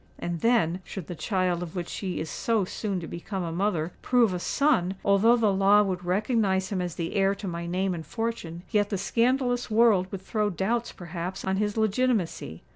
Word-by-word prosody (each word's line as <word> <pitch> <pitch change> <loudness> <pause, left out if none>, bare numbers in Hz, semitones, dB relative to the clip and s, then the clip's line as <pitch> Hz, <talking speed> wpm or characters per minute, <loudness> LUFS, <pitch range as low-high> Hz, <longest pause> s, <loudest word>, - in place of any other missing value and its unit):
And 175 -1 -3
then—should 190 -5 0
the 175 - -6
child 180 0 0
of 175 0 -6
which 175 -2 -3
she 185 -3 -4
is 160 - -3
so 220 +3 0
soon 195 0 -3
to 165 - -6
become 185 +2 -5
a 165 - -3
mother, 175 -2 -1
prove 240 -6 +3
a 180 - -2
son—although 200 -3 +3
the 220 -4 +2
law 200 +2 +5
would 185 -3 -3
recognise 190 0 +1
him 190 -3 -1
as 175 -2 -4
the 165 -1 -3
heir 195 0 +2
to 200 0 -7
my 170 -1 -4
name 185 +2 0
and 165 -2 -5
fortune, 175 -3 -4
yet 205 -2 +2
the 200 - -1
scandalous 245 +4 +1
world 215 -4 +4
would 190 -1 -6
throw 210 0 0
doubts, 225 +6 -1
perhaps, 175 +1 -6
on 190 0 0
his 210 +1 -1
legitimacy. 220 - 0
195 Hz, 195 wpm, -27 LUFS, 175-220 Hz, -, law